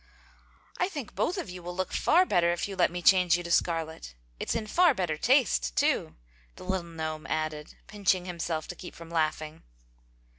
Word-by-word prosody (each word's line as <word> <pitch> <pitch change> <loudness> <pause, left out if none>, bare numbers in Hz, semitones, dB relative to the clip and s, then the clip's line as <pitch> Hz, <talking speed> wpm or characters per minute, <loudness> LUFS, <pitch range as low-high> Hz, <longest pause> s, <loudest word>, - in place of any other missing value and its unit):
"I 360 - +1
think 285 - -7
both 365 - -1
of 360 - -4
you 180 0 -8
will 175 +1 -7
look 185 0 -3
far 360 +3 +4
better 170 - +3
if 175 - -2
you 195 - -6
let - - +3
me 175 0 -6
change 180 -2 +5
you 175 - -5
to 170 - -5
scarlet. 160 - -1 0.2
It's - - -2
in 225 - -2
far 335 +7 +4
better 175 -6 -1
taste, - - +2
too!" - - +1 0.4
the - - -11
little 190 -2 -2
gnome 160 -1 -5
added, 155 -1 -3
pinching 190 -3 0
himself 170 -3 -3
to 180 - -5
keep 175 - -10
from 165 0 -11
laughing. 155 -1 -1
175 Hz, 190 wpm, -28 LUFS, 155-190 Hz, 0.4 s, change